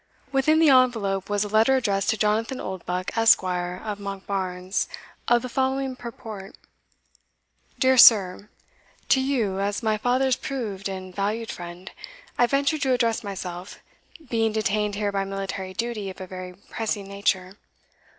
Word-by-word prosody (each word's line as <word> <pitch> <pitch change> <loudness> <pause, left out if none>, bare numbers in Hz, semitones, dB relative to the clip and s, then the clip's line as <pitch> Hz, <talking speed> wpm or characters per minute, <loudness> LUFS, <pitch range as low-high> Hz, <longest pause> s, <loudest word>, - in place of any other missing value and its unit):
Within 280 +3 +3
the 320 -3 +6
envelope 225 -8 +2
was 205 0 +1
a - - -3
letter 220 +5 +4
addressed 200 -6 0
to 220 - +2
Jonathan 220 +4 0
Oldbuck, 185 -1 -4
Esq. 225 -3 +5
of 180 +3 -3
Monkbarns, 190 -2 -3 0.4
of 240 0 +3
the - - -3
following 265 +1 -1
purport: 220 -5 -9 1.2
"Dear 260 -2 +4
Sir, 200 -3 +7 0.6
To 265 - +4
you, 235 -8 0
as 205 +3 -1
my 215 -1 +1
father's 255 +2 +2
proved 210 -8 -4
and 185 -1 -7
valued 215 +3 -2
friend, 175 +1 -9 0.4
I 245 - +3
venture 280 +4 +1
to 265 -2 +1
address 230 -3 +1
myself, 185 -2 -6 0.5
being 225 -2 +1
detained 210 -1 0
here 205 0 -1
by 195 -1 -1
military 195 -1 -5
duty 230 -3 -3
of 190 - -10
a 190 - -6
very 185 0 -8 0.2
pressing 210 -3 -3
nature. 195 -2 -1
210 Hz, 145 wpm, -25 LUFS, 195-240 Hz, 1.2 s, Sir